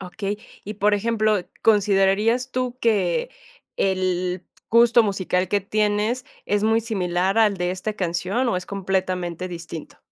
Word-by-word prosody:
Okey. 195 +2 -4 0.3
Y 210 +2 -6
por 210 +1 +2
ejemplo, 215 -1 +1 0.2
¿considerarías 210 +4 +3
tú 255 -1 -2
que 215 - +1 0.5
el 185 -1 0 0.2
gusto 235 +1 +5
musical 190 -3 -1
que 205 - +1
tienes 215 +4 0 0.2
es 205 0 0
muy 225 +1 +3
similar 190 -3 0
al 210 -3 +4
de 180 -1 -1
esta 190 +4 -4
canción, 185 +6 -1
o 185 - +1
es 180 - -5
completamente 185 -2 -2
distinto? 165 -2 -8
200 Hz, 135 wpm, -23 LUFS, 185-220 Hz, 0.5 s, gusto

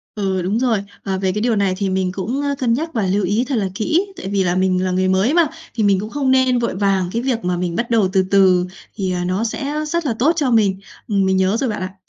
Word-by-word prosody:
Ừ, 190 -3 -1
đúng 195 +6 -1
rồi. 230 -6 +1 0.2
Ờ, 190 -1 -2
về 190 -1 0
cái 210 - -3
điều 235 0 +1
này 200 -2 +1
thì 200 -1 -1
mình 185 -1 0
cũng, 215 +9 -3
ơ, 285 0 -1
cân 240 -3 +1
nhắc 320 +7 -2
và 220 -4 0
lưu 195 +2 +1
ý 210 +7 +1
thật 275 - -1
là 200 -4 0
kỹ, 320 - +1
tại - - -6
vì 200 -1 +1
là 175 -1 0
mình 185 0 +1
là 185 - 0
người 185 +1 +1
mới 190 +8 +2
mà, 340 -2 +4 0.3
thì 225 - -1
mình 200 -2 +3
cũng 210 +2 -5
không 275 0 0
nên 260 -1 +3
vội 235 -5 -2
vàng, 195 -2 +1
cái 230 - 0
việc 245 -3 -1
mà 180 0 0
mình 175 -1 -2
bắt 235 +4 -2
đầu 220 -5 +2
từ 190 -1 +3
từ 185 -2 +4 0.3
thì, 190 -3 -2
ờ, 180 -1 -2
nó 185 +4 -1
sẽ 275 +5 -3
rất 340 +1 -1
là 255 - 0
tốt 285 +7 +4
cho 285 -6 0
mình. 200 -4 +2 0.3
Mình 195 -3 +1
nhớ 190 +3 +2
rồi 265 - 0
bạn 210 - -4
ạ. 185 0 -5
200 Hz, 285 wpm, -19 LUFS, 190-240 Hz, 0.3 s, mà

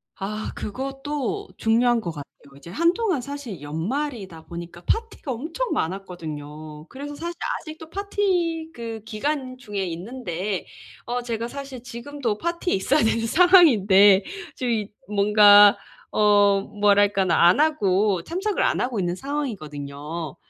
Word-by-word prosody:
아 210 +3 -4
그것도 275 - -4
중요한 235 +2 +3
것 175 - -4
같아요. 145 -3 -9 0.3
이제 140 +4 -13
한동안 340 - +1
사실 250 - -7
연말이다 190 - -4
보니까 170 0 -9
파티가 450 - -2
엄청 325 - -3
많았거든요. 155 -4 -5
그래서 290 +2 -7
사실 340 +3 -5 0.3
아직도 315 0 -10
파티 355 -4 -1
그 230 -3 -6
기간 255 +3 -3
중에 210 -6 -4
있는데 185 +1 -4 0.4
어 245 +1 -2
제가 235 -1 -3
사실 275 -1 -8
지금도 240 -2 -4
파티에 340 +5 -2
있어야 270 +10 +2
되는 225 +1 +1
상황인데 215 - +6 0.3
지금 245 -2 -1
이 215 -2 -3 0.2
뭔가 205 0 +7 0.3
어 205 -1 +4
뭐랄까나 200 -4 +3
안 180 - +4
하고 205 - +2
참석을 385 - -2
안 - - +1
하고 245 -4 -1
있는 175 -1 -1
상황이거든요. 160 - -5
225 Hz, 295 characters per minute, -23 LUFS, 190-285 Hz, 0.4 s, 뭔가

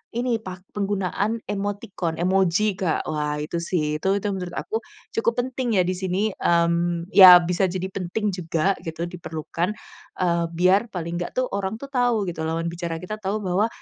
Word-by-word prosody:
ini, 240 -2 0
pak 185 -1 -8
penggunaan 205 +2 -1
emoticon, 200 -4 -3
emoji 190 +3 +2
Kak. 175 -5 0
Wah 150 -1 -1
itu 160 +3 -3
sih, 150 -4 0
itu - - -2
itu 205 - -3
menurut 180 -2 -5
aku, - - -5 0.4
cukup 230 +1 +2
penting 250 -4 -1
ya - - +5
di 185 - +1
sini, 190 +3 -1
mmm, 170 0 +1
ya 185 -2 +11
bisa 180 +2 0
jadi 185 +1 -3
penting 200 +3 -2
juga 170 +2 0
gitu, 165 +1 -3
diperlukan, 170 0 -4 0.5
eee, 170 -2 +2
biar 190 +6 +4
paling 170 -2 -4
enggak 175 - -4
tuh, 255 - +2
orang 195 +1 -2
tuh 275 - -6
tahu 240 -6 +2
gitu, 165 -2 -5
lawan 165 +1 -1
bicara 170 -1 -4
kita 215 +4 -4
tahu 195 +3 0
bahwa, 190 +5 +2
185 Hz, 175 wpm, -24 LUFS, 170-205 Hz, 0.5 s, ya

